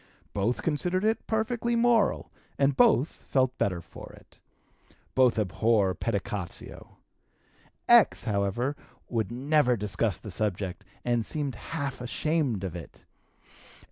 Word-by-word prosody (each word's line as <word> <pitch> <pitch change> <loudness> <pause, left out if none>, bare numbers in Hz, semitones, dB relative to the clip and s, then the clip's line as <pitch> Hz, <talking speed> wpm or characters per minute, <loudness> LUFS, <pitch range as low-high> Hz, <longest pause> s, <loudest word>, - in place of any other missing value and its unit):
Both 105 +5 -1
considered 175 +4 0
it 220 +1 0
perfectly 230 +2 0
moral, 235 -2 +2 0.3
and 140 -1 +2
both, 220 - +5
felt 130 -5 -1
better 90 -3 0
for - - -11
it. - - -19 0.7
Both 130 -3 +4
abhor 105 0 +2
pedicatio. 100 -4 -5 0.9
X., 235 -3 +6
however, 110 +5 -1 0.3
would 115 -2 -1
never 130 0 +2
discuss 100 -2 0
the 105 - -9
subject, 95 -2 -2 0.2
and 120 -2 +1
seemed 145 +2 -3
half 140 -6 -5
ashamed 130 - -1
of 95 -3 -4
it. 85 -3 -10
125 Hz, 115 wpm, -28 LUFS, 100-155 Hz, 0.9 s, X